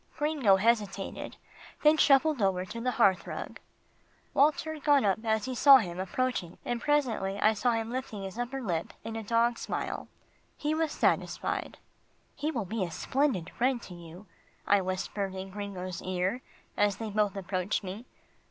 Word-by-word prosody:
Gringo 295 Hz, -10 st, +3 dB
hesitated, 205 Hz, -1 st, -1 dB, 0.5 s
then 300 Hz, 0 st, +7 dB
he -, -, -2 dB
shuffled 285 Hz, -2 st, +4 dB
over 185 Hz, -2 st, +1 dB
to 230 Hz, +4 st, -7 dB
the 250 Hz, -, 0 dB
hearth 190 Hz, -3 st, +3 dB
rug. -, -, -6 dB, 0.7 s
Walter 310 Hz, +2 st, +2 dB
got 290 Hz, -2 st, +4 dB
up 200 Hz, 0 st, +2 dB
as 220 Hz, -1 st, +1 dB
he 260 Hz, -, -3 dB
saw 275 Hz, +2 st, +8 dB
him 180 Hz, -7 st, -3 dB
approaching 190 Hz, -2 st, -2 dB
and 240 Hz, -1 st, -2 dB
presently 225 Hz, -10 st, 0 dB
I 215 Hz, +2 st, +4 dB
saw 240 Hz, +3 st, +1 dB
him 225 Hz, 0 st, -2 dB
lifting 250 Hz, -6 st, -4 dB
his 195 Hz, +4 st, -7 dB
upper 255 Hz, +2 st, -3 dB
lip 170 Hz, -6 st, -2 dB
in 225 Hz, +1 st, -5 dB
a 225 Hz, -, -3 dB
dog 230 Hz, +2 st, +1 dB
smile. -, -, -4 dB, 0.5 s
He 300 Hz, +1 st, -1 dB
was 315 Hz, -1 st, 0 dB
satisfied. -, -, -1 dB, 0.6 s
"He 300 Hz, -, -2 dB
will 240 Hz, -10 st, -2 dB
be 210 Hz, +2 st, -2 dB
a 175 Hz, -, -3 dB
splendid 235 Hz, -, -1 dB
friend 255 Hz, +1 st, +1 dB
to 180 Hz, -, -9 dB
you," 175 Hz, +3 st, -11 dB, 0.4 s
I 200 Hz, -1 st, +4 dB
whispered 190 Hz, +1 st, -3 dB
in 190 Hz, 0 st, -6 dB
Gringo's 185 Hz, -3 st, -5 dB
ear, 185 Hz, +6 st, -1 dB, 0.3 s
as 205 Hz, -2 st, +2 dB
they 220 Hz, -2 st, -5 dB
both 205 Hz, -1 st, +1 dB
approached 190 Hz, +1 st, -2 dB
me. 200 Hz, +6 st, -7 dB
215 Hz, 170 wpm, -29 LUFS, 190-255 Hz, 0.7 s, saw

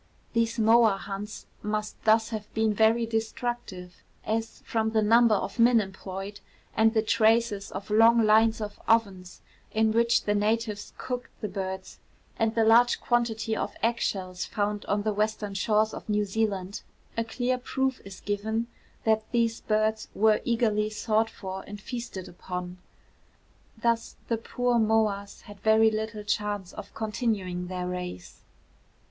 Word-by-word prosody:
These 230 Hz, 0 st, +1 dB
moa 225 Hz, -2 st, +5 dB
hunts 200 Hz, +2 st, -7 dB, 0.2 s
must 210 Hz, 0 st, -3 dB
thus 220 Hz, +1 st, +4 dB
have 215 Hz, -2 st, -6 dB
been 220 Hz, -1 st, +2 dB
very 225 Hz, +2 st, +3 dB
destructive; 225 Hz, -5 st, -4 dB, 0.3 s
as, 225 Hz, +1 st, -3 dB
from 220 Hz, -1 st, 0 dB
the 220 Hz, -1 st, +2 dB
number 230 Hz, +1 st, +5 dB
of 195 Hz, +2 st, -4 dB
men 235 Hz, 0 st, +6 dB
employed, 195 Hz, 0 st, -6 dB, 0.4 s
and 220 Hz, +1 st, +3 dB
the 220 Hz, -, +3 dB
traces 220 Hz, -2 st, +2 dB
of 195 Hz, +2 st, -7 dB
long 225 Hz, +2 st, +6 dB
lines 220 Hz, +1 st, +4 dB
of 210 Hz, -1 st, -6 dB
ovens 195 Hz, -5 st, +1 dB, 0.3 s
in 220 Hz, 0 st, +2 dB
which 235 Hz, +1 st, +3 dB
the 205 Hz, -, +1 dB
natives 210 Hz, 0 st, -1 dB
cooked 250 Hz, -1 st, -4 dB
the 215 Hz, -, -3 dB
birds, 190 Hz, -1 st, -5 dB, 0.4 s
and 225 Hz, -1 st, 0 dB
the 225 Hz, -, +3 dB
large 235 Hz, +2 st, +5 dB
quantity 225 Hz, -2 st, 0 dB
of -, -, -3 dB
egg 230 Hz, 0 st, +2 dB
shells 185 Hz, -2 st, -2 dB
found 205 Hz, 0 st, -2 dB
on 205 Hz, 0 st, 0 dB
the 215 Hz, 0 st, 0 dB
western 210 Hz, -1 st, -1 dB
shores 215 Hz, +2 st, +1 dB
of -, -, -8 dB
New 210 Hz, 0 st, +2 dB
Zealand, 200 Hz, -2 st, -2 dB, 0.3 s
a 230 Hz, -, 0 dB
clear 250 Hz, +2 st, -1 dB
proof 265 Hz, +1 st, -1 dB
is 195 Hz, -1 st, -11 dB
given 220 Hz, +3 st, -1 dB, 0.4 s
that 220 Hz, -1 st, +1 dB
these 230 Hz, -2 st, +1 dB
birds 215 Hz, 0 st, 0 dB
were 215 Hz, +1 st, +4 dB
eagerly 220 Hz, -3 st, +1 dB
sought 220 Hz, +1 st, 0 dB
for 190 Hz, -3 st, -7 dB
and 205 Hz, 0 st, -8 dB
feasted 230 Hz, -4 st, -6 dB
upon. 180 Hz, 0 st, -6 dB, 1.0 s
Thus 230 Hz, 0 st, 0 dB
the 230 Hz, -, +1 dB
poor 245 Hz, +1 st, 0 dB
moas 215 Hz, -2 st, +1 dB
had 205 Hz, -1 st, -13 dB
very 220 Hz, +2 st, +4 dB
little 215 Hz, 0 st, -4 dB
chance 205 Hz, -2 st, -2 dB
of 205 Hz, -1 st, -9 dB
continuing 210 Hz, -5 st, -2 dB
their 180 Hz, 0 st, -4 dB
race. 180 Hz, -, -6 dB
220 Hz, 150 wpm, -27 LUFS, 205-225 Hz, 1.0 s, men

